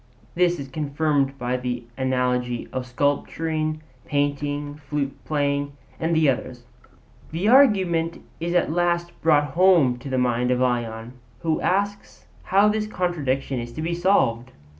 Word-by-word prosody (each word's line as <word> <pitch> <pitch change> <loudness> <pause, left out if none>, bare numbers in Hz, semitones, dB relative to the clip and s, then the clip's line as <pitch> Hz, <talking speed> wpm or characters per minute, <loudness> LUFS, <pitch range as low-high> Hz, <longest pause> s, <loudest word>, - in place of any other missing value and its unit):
This 175 0 +2
is 140 - -6
confirmed 140 -1 0
by 125 0 -1
the 125 -1 -3
analogy 125 -2 -1
of 130 -1 -3
sculpture, 155 +4 -1 0.3
painting, 145 +1 -2
flute 140 -1 -2
playing, 145 -1 -1 0.3
and 165 +1 0
the 160 -1 +4
other 135 -2 +1
arts. 125 -1 -12 0.7
The 170 +6 -1
argument 190 -10 +4 0.2
is 170 +2 -2
at 175 - +2
last 175 0 0
brought 145 -3 +3
home 165 -8 +4
to 135 - -8
the 130 - -1
mind 125 -1 +1
of 125 0 +2
Ion, 120 -2 -1 0.3
who 160 -1 0
asks 200 +2 -2 0.2
how 200 +2 +4
this 215 0 0
contradiction 140 -9 -1
is 120 0 -6
to 155 - -5
be 170 +1 -1
solved. 170 -10 +2
145 Hz, 145 wpm, -23 LUFS, 125-170 Hz, 0.7 s, the